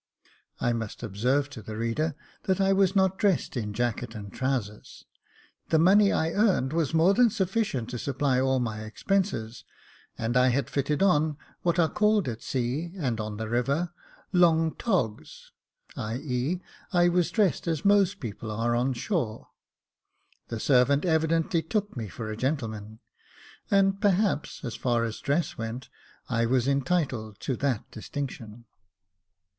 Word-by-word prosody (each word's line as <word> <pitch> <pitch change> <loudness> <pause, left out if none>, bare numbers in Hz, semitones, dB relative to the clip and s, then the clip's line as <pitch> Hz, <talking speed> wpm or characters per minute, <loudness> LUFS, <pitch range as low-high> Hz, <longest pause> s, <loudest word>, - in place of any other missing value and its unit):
I 120 - +1
must 115 -2 -5
observe 125 +8 0
to 120 - -8
the 110 +1 -7
reader 130 +7 -1 0.3
that 190 -1 +1
I 195 0 +4
was 195 0 +3
not 190 -1 +2
dressed 195 -8 +1
in 105 -4 -2
jacket 115 0 -2
and 100 -2 -8
trousers. 125 -6 -3 0.6
The 160 - +4
money 195 +5 +5
I 160 +1 +1
earned 190 - +2
was 165 -4 +1
more 170 +5 +5
than 245 +2 +5
sufficient 190 - -1
to 125 - -4
supply 135 0 0
all 130 0 +2
my 110 -3 -2
expenses, 120 - -2 0.5
and 115 +2 -2
I 125 0 +5
had 130 +2 0
fitted 145 +3 0
on 155 -5 +3 0.2
what 170 -1 +1
are 170 -2 +4
called 210 -2 +2
at 115 -2 -4
sea, 135 +7 -2
and 125 -9 -1
on 105 -1 -4
the 110 0 -4
river, 135 +9 0 0.4
long 165 -3 +4
togs; 150 - -2 0.4
i.e., 125 +8 -2 0.3
I 175 -1 +4
was 175 -1 +2
dressed 200 -6 +1
as 160 -1 -1
most 200 -1 +4
people 110 -3 -6
are 115 +3 0
on 125 +2 +1
shore. 125 - -3 1.0
The 115 - -4
servant 140 +4 +3
evidently 165 0 +2
took 205 +4 -2
me 115 -4 -4
for 110 +3 -6
a - - -4
gentleman; 110 -5 -3 0.7
and 195 0 +3
perhaps, 200 -5 +1
as 120 - -4
far 120 -2 +1
as 115 -2 -3
dress 145 0 -1
went, 115 +3 -5 0.4
I 115 -2 +1
was 125 +1 +2
entitled 135 - 0
to 130 - -1
that 135 -6 -1
distinction. 115 -2 -6
140 Hz, 150 wpm, -27 LUFS, 115-175 Hz, 1.0 s, money